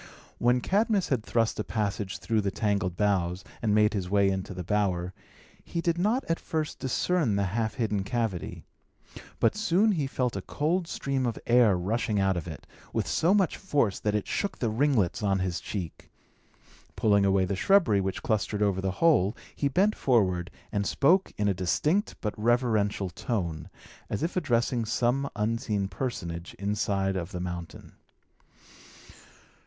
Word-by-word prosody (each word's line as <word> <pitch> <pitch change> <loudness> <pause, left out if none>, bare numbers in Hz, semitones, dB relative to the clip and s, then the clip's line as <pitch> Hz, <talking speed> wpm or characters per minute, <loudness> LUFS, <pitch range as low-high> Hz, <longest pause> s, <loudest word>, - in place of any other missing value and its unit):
When 125 +1 +3
Cadmus 205 - +1
had 125 -6 0
thrust 115 -1 0
a - - 0
passage 105 -3 -2
through 110 -2 0
the 100 - 0
tangled 100 -4 -1
boughs, 95 -3 0 0.2
and 105 -3 +2
made 105 0 +4
his 95 -4 -2
way 100 0 +3
into 95 +1 -3
the 90 -1 -5
bower, 90 -2 0 0.5
he 170 - -4
did 170 0 0
not 220 +8 +1
at 165 - -1
first 155 -1 -3
discern 145 - +1
the 100 - +1
half 110 +3 -1
hidden 105 -5 -1
cavity. 110 -5 -3 0.7
But - - +3
soon 210 0 +3
he 155 -8 0
felt 125 -4 -1
a 95 - -3
cold 165 - -1
stream 135 -5 -1
of 115 - -3
air 115 -5 +5
rushing 105 +3 -1
out 95 -1 +2
of 85 -1 -4
it, 80 - -8 0.3
with - - -1
so 180 +5 +2
much 195 -4 +2
force 140 - 0
that 105 -1 0
it 105 - -1
shook 200 - -2
the 115 -3 -1
ringlets 120 - +1
on 100 -2 +2
his 95 -2 -2
cheek. 90 -6 -6 0.9
Pulling 100 -2 +3
away 95 -1 +3
the 95 - -2
shrubbery 140 - +4
which 95 0 -3
clustered 105 -1 0
over 95 -2 +1
the 95 - -1
hole, 110 - +3 0.2
he 140 - 0
bent 195 +10 +2
forward, 95 -8 +1 0.2
and 100 -1 -1
spoke 180 +7 +3
in 105 - +1
a 100 - +3
distinct 150 - 0
but 105 - -2
reverential 110 -5 +1
tone, 90 -5 -3 0.4
as - - -2
if 170 - -2
addressing 120 -7 +1
some 120 +5 0
unseen 105 -2 -1
personage 90 -6 -5
inside 100 -1 -1
of 90 0 -4
the 90 - -4
mountain. 90 -1 -6
105 Hz, 165 wpm, -28 LUFS, 95-135 Hz, 0.9 s, air